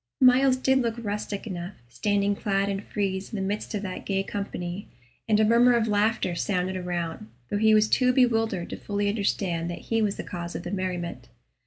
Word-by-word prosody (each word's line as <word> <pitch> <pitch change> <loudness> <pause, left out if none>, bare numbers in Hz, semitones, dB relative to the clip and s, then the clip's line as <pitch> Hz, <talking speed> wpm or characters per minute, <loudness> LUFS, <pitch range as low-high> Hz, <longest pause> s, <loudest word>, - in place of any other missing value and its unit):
Myles 255 0 +5
did 265 +1 +3
look 230 -3 0
rustic 210 -2 -4
enough, 185 -2 -5
standing 200 - 0
clad 195 0 0
in 195 -1 -1
frieze 195 -2 -3
in - - -5
the 190 -2 -1
midst 210 +2 -3
of 205 - -3
that 185 -2 -5
gay 195 -1 0
company, 195 -2 -5 0.4
and 215 -1 +4
a 220 - +5
murmur 240 +2 +5
of 230 -1 +2
laughter 210 -3 +1
sounded 185 +1 -1
around, 175 -9 -4 0.2
though 205 - 0
he 220 0 +5
was 215 0 +4
too 250 +3 +3
bewildered 225 -7 +1
to - - -4
fully 205 0 -1
understand 190 -5 -1
that 175 - -4 0.2
he 225 - +3
was 205 -2 +1
the - - -4
cause 175 -2 -6
of - - -4
the 175 - -5
merriment. 180 -3 -4
205 Hz, 200 wpm, -26 LUFS, 185-220 Hz, 0.4 s, Myles